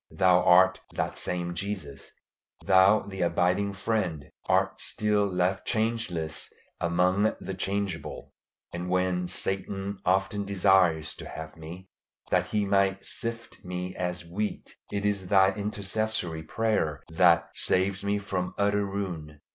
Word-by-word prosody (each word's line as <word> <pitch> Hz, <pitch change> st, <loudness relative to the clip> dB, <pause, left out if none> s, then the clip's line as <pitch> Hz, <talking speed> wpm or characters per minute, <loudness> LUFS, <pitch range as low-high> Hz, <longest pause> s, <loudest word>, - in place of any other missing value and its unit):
Thou 90 Hz, -1 st, +4 dB
art 95 Hz, +1 st, +6 dB, 0.2 s
"that -, -, -1 dB
same 85 Hz, -1 st, -2 dB
Jesus;" 85 Hz, -7 st, -5 dB, 0.6 s
Thou, 95 Hz, +3 st, +6 dB
the 95 Hz, -1 st, -7 dB
abiding 90 Hz, +4 st, +1 dB
Friend, 95 Hz, -7 st, -2 dB, 0.2 s
art -, -, +1 dB
still 105 Hz, -1 st, +1 dB
left 95 Hz, +1 st, 0 dB
changeless 110 Hz, -9 st, -1 dB, 0.3 s
among 90 Hz, +5 st, +2 dB
the 95 Hz, -, -5 dB
changeable; 95 Hz, -2 st, -3 dB, 0.4 s
and 90 Hz, +1 st, -4 dB
when 90 Hz, -1 st, +1 dB
Satan 95 Hz, +1 st, -2 dB
often 95 Hz, +2 st, +1 dB
desires 95 Hz, -5 st, +3 dB
to -, -, -8 dB
have 80 Hz, 0 st, -8 dB
me, 85 Hz, +4 st, -10 dB, 0.4 s
that -, -, +2 dB
he 105 Hz, -1 st, 0 dB
might 100 Hz, -1 st, +1 dB
sift 115 Hz, -1 st, -5 dB
me 90 Hz, 0 st, -5 dB
as 90 Hz, -1 st, -3 dB
wheat, 100 Hz, +5 st, -4 dB, 0.2 s
it 100 Hz, 0 st, -2 dB
is 100 Hz, -3 st, 0 dB
Thy 95 Hz, -1 st, +5 dB
intercessory 100 Hz, -4 st, -2 dB
prayer 80 Hz, -4 st, -1 dB
that 85 Hz, 0 st, +4 dB
saves 95 Hz, +1 st, +1 dB
me 100 Hz, +1 st, +1 dB
from 95 Hz, -3 st, -3 dB
utter 100 Hz, 0 st, +2 dB
ruin. 90 Hz, -7 st, -5 dB
95 Hz, 130 wpm, -28 LUFS, 90-100 Hz, 0.6 s, art